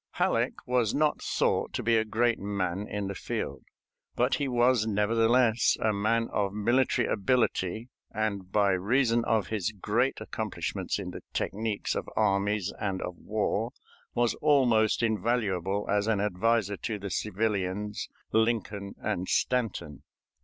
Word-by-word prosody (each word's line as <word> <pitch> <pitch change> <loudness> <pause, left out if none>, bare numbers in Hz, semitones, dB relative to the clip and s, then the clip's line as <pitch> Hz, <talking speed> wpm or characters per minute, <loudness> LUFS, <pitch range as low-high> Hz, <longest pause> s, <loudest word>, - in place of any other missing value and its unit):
Halleck - - +1
was 125 -3 +1
not 150 0 +1
thought - - 0
to - - -2
be 115 0 +3
a 110 - +3
great 115 +2 +1
man 100 -1 -2
in 105 -1 -3
the 100 - -3
field, - - -4 0.5
but - - +2
he 145 - 0
was 120 -2 +3
nevertheless 115 +3 +3
a 110 -1 +1
man 115 +3 +1
of 100 -2 0
military 120 +3 +2
ability, 110 -1 0 0.2
and 100 -4 -3
by 100 -1 +3
reason 115 +5 +2
of 110 -5 +1
his 110 -1 -1
great 110 +6 0
accomplishments - - -3
in - - -5
the - - -8
technics 105 0 -2
of - - -4
armies 100 0 +1
and 100 -3 -2
of 90 - -5
war 110 +4 -2 0.4
was 120 -1 +2
almost 120 -8 +3
invaluable 105 -4 0
as 105 +1 +1
an 110 -3 +2
adviser 105 +1 +1
to 110 -3 -3
the 100 -1 -6
civilians 105 0 -2 0.2
Lincoln 110 -3 0
and 90 +1 -3
Stanton. 115 - -1
110 Hz, 140 wpm, -28 LUFS, 100-115 Hz, 0.5 s, be